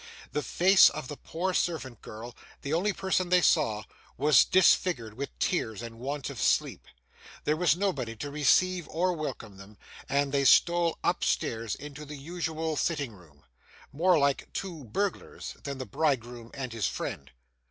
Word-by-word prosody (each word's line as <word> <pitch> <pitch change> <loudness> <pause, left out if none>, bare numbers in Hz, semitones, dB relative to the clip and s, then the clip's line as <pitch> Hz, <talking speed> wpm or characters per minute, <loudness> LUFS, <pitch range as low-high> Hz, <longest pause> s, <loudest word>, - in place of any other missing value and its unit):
The 150 - -1
face 190 +5 +6
of 130 - -7
the 145 - -5
poor 180 +6 -3
servant 135 -11 -2
girl, 115 +3 -9 0.3
the 140 - -2
only 185 +6 +2
person 190 -2 -1
they 180 0 +4
saw, 110 -10 +2 0.3
was 145 -7 +5
disfigured 170 - +3
with 140 +5 -6
tears 110 - -1
and 115 -1 -9
want 140 +2 -4
of - - -7
sleep. - - +1 0.6
There 150 - +1
was 165 -1 +3
nobody 150 - -2
to 145 +6 -6
receive 170 +4 +2
or 180 +3 +1
welcome 130 - -6
them; 100 +2 -14 0.3
and 140 0 +1
they 140 0 +1
stole 170 +3 +4
upstairs 115 -2 0
into 145 +1 -9
the 150 0 -8
usual 160 +1 -3
sitting 145 -8 -1
room, 80 -7 -19 0.5
more 175 +5 +3
like 140 -2 0
two 170 -8 -5
burglars 195 - -3
than 140 -1 -5
the 130 - -5
bridegroom 120 -2 -1
and 130 -3 -5
his 110 -4 0
friend. 70 - -5
145 Hz, 160 wpm, -28 LUFS, 120-170 Hz, 0.6 s, face